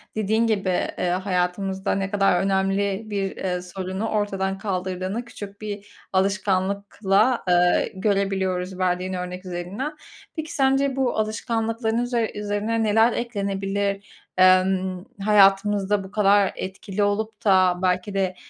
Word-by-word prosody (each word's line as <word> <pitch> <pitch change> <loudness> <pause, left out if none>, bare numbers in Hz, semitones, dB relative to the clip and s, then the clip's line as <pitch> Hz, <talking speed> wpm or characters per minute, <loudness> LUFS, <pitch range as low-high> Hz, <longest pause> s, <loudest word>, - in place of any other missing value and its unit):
dediğin 220 +2 +1
gibi, 200 -4 0 0.3
eee, 180 - 0
hayatımızda 190 +1 -1
ne 195 0 -2
kadar 195 -3 +3
önemli 195 +1 0
bir, 195 -2 -2
eee, 180 -1 -2
sorunu 190 +4 -4
ortadan 195 -2 -1
kaldırdığını 190 +2 -3
küçük 205 -3 -10
bir 205 -1 -6 0.3
alışkanlıkla, 200 +3 +1
eee, 175 0 +3
görebiliyoruz 190 -2 -1
verdiğin 185 0 0
örnek 180 +1 -5
üzerinden. 185 - -4 0.4
Peki, 315 -1 -5
sence 270 -1 +2
bu 265 -2 0
alışkanlıkların 225 +1 -1
üzer 240 -2 0
üzerine 210 +2 -1
neler 225 +2 +4
eklenebilir? 200 -3 -2 0.3
Emm, 185 0 +3 0.2
hayatımızda 200 0 +4
bu 190 - -11
kadar 205 -1 +4
etkili 195 +2 -4
olup 210 +1 -2
da 185 -3 +4
belki 185 +2 0
de, 190 -2 0
195 Hz, 120 wpm, -23 LUFS, 185-215 Hz, 0.4 s, neler